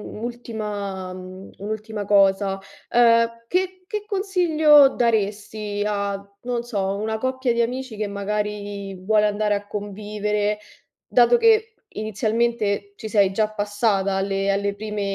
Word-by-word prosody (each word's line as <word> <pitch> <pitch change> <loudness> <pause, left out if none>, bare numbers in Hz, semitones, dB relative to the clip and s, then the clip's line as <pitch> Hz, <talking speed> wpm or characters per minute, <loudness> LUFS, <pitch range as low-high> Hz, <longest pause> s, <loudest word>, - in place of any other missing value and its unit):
un'ultima 210 -5 -5
mhmm, 185 +1 -10
un'ultima 215 0 -5
cosa, 195 -1 +3 0.3
ehm, 230 -1 +4
che 370 +2 -1
che 420 0 -3
consiglio 325 -8 +5
daresti 210 -3 -1
a, 200 -1 -1 0.2
non 240 -1 -2
so, 200 -4 -2
una 220 +1 -2
coppia 260 -1 0
di 235 - +1
amici 250 0 -3
che 210 0 -2
magari 205 -1 -3
vuole 210 +3 +2
andare 210 0 0
a 205 0 -3
convivere, 210 0 -2 0.5
dato 245 - +5
che 445 -1 +4 0.2
inizialmente 215 -1 -1
ci 220 - -6
sei 200 -3 +3
già 215 +2 +1
passata 205 -2 0
alle 195 0 0
alle 200 0 0
prime 210 0 -4
210 Hz, 125 wpm, -23 LUFS, 200-235 Hz, 0.5 s, consiglio